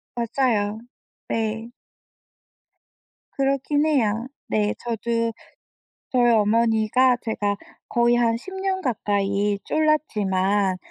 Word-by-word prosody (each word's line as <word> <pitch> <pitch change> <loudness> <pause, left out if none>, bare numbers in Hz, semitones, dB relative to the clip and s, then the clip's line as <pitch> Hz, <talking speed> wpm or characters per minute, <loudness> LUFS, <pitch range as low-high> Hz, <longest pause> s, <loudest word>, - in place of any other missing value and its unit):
맞아요. 230 -3 0 0.5
네. 225 +1 -2 1.7
그렇긴 275 +2 +1
해요. 235 -5 +1 0.2
네, 210 -1 +1
저도 230 0 -1 0.8
저희 240 -2 +4
어머니가 225 +3 +3
제가 205 -3 -1 0.3
거의 240 0 +3
한 230 -1 +2
10년 380 +5 -3
가까이 205 -4 0
졸랐지만 205 -11 +1
230 Hz, 170 characters per minute, -23 LUFS, 210-255 Hz, 1.7 s, 저희